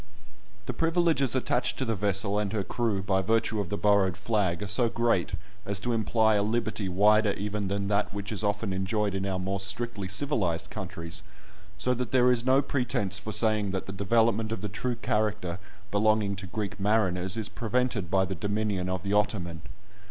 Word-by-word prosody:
The - - -3
privileges 165 -6 +2
attached 125 -1 0
to 130 - -1
the 115 - 0
vessel 100 0 +1
and 105 -2 -1
her 105 -3 0
crew 110 -3 -1
by 95 +1 +1
virtue 110 +1 +1
of 100 -4 -2
the 105 - -2
borrowed 100 -3 +3
flag 100 -6 0
are - - -4
so 115 +4 +2
great, 115 -7 +1 0.3
as 100 -1 -1
to 120 +2 -1
imply 110 0 +2
a 105 - +3
liberty 110 -2 -1
wider 105 +3 +4
even 105 0 -3
than 100 +1 -1
that 105 0 +1
which 100 +1 -5
is 105 0 -1
often 105 -1 0
enjoyed 100 +2 0
in 95 0 -2
our 95 -1 -1
more 95 +1 -2
strictly 100 0 -2
civilised 100 - -1
countries, 85 0 -6 0.6
so 125 - +1
that 125 0 -3
there 125 -1 +5
is 120 -2 +1
no 130 +2 +4
pretence 105 -8 0
for 110 - -5
saying 110 -1 +2
that 95 0 -3
the 100 - -6
development 110 +2 +2
of 115 - -3
the 105 - -3
true 120 +5 -2
character 105 -6 -1 0.3
belonging 105 -1 +2
to 95 -1 -6
Greek 100 +1 -4
mariners 95 -2 +1
is 110 -3 -1
prevented 120 -5 -1
by 95 +1 +3
the 95 - -4
dominion 100 -1 -1
of 95 0 -2
the 100 0 -1
Ottoman. 90 -6 0
105 Hz, 190 wpm, -28 LUFS, 95-115 Hz, 0.6 s, there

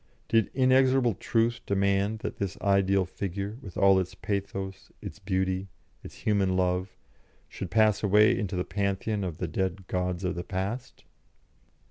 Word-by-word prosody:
Did 115 -2 +2
inexorable 130 -2 +4
Truth 115 +4 0
demand 100 +2 +1
that - - -4
this 100 -3 -3
ideal 100 -1 +2
Figure, 100 +4 -5
with 95 -8 -9
all 95 -1 +5
its 95 0 -4
pathos, 95 -2 -4
its - - -8
beauty, 95 -1 -1 0.4
its - - -10
human 100 -3 +1
love, 90 +1 0 0.5
should 95 - -6
pass 110 0 +3
away 105 +1 +5
into 100 -3 -3
the 90 - -1
Pantheon 100 +1 -1
of 85 -4 -4
the 90 - -3
dead 95 +3 -2
Gods 90 0 -2
of 90 - 0
the 85 - -4
Past? 100 +9 -4
100 Hz, 150 wpm, -28 LUFS, 95-105 Hz, 0.5 s, all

